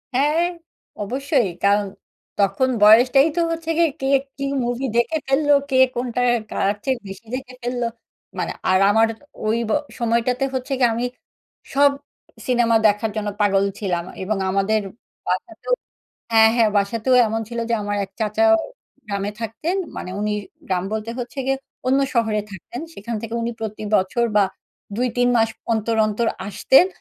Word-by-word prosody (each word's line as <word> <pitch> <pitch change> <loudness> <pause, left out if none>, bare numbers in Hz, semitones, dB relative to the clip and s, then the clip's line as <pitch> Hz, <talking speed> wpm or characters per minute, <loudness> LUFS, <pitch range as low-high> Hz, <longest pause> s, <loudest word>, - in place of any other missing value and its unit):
হ্যাঁ, 300 +6 +3 0.6
অবশ্যই। 260 - 0
কারণ 200 +1 +4 0.5
তখন 200 +6 +2
বয়সটাই 250 +6 +7
তো - - 0
হচ্ছে 330 0 -4
গিয়ে 335 -1 +4
কে 270 - 0 0.3
কি 275 - -4 0.2
মুভি 245 +2 -2
দেখে 240 +7 +2
ফেললো? 290 +2 +2 0.2
কে 260 - +2 0.2
কোনটা 245 0 -2 0.3
কার 200 +1 +1
চেয়ে 265 -2 0
বেশি 195 +4 -9
দেখে 260 -1 -7
ফেললো? 245 0 -2 0.5
মানে - - -2 0.2
আর 185 - +4
আমার 225 +2 +4 0.4
ওই 220 +2 +2
ব - - 0 0.3
সময়টাতে 235 +3 +1
হচ্ছে 260 +1 -2
কি? 255 - +2
আমি 240 +2 -1 0.7
সব 285 +1 +5 0.6
সিনেমা 240 -2 +3
দেখার 210 +2 +1
জন্য 210 -1 -2
পাগল 200 -1 +3 0.2
ছিলাম। 175 -4 -1 0.2
এবং 210 +1 -1
আমাদের 200 +3 +1 0.5
বাসাতেও - - -2 0.6
হ্যাঁ, 220 0 +7
হ্যাঁ। 225 -2 +4
বাসাতেও 225 +5 +1
এমন 220 +1 -1
ছিল 235 -1 -6
যে - - +3
আমার 205 0 -2
এক 190 - -15
চাচাও 330 +11 +3 0.5
গ্রামে 200 0 -2
থাকতেন। 230 - -2 0.2
মানে 180 - -5
উনি 210 0 0 0.4
গ্রাম 185 -1 0
বলতে 220 +1 -3
হচ্ছে 245 +2 -6
গিয়ে 270 0 +2 0.3
অন্য 265 +2 +3 0.2
শহরে 220 -3 +2
থাকতেন। 200 - -8
সেখান 230 +4 -5
থেকে 230 0 -6
উনি 235 - -1
প্রতি 215 -1 -5
বছর 195 +5 +2
বা 205 - +6 0.5
২-৩ 245 0 +1
মাস 225 0 +3 0.2
অন্তর, 225 +1 0
অন্তর 215 +2 -1 0.2
আসতেন 265 - +4
230 Hz, 155 wpm, -21 LUFS, 210-255 Hz, 0.7 s, বয়সটাই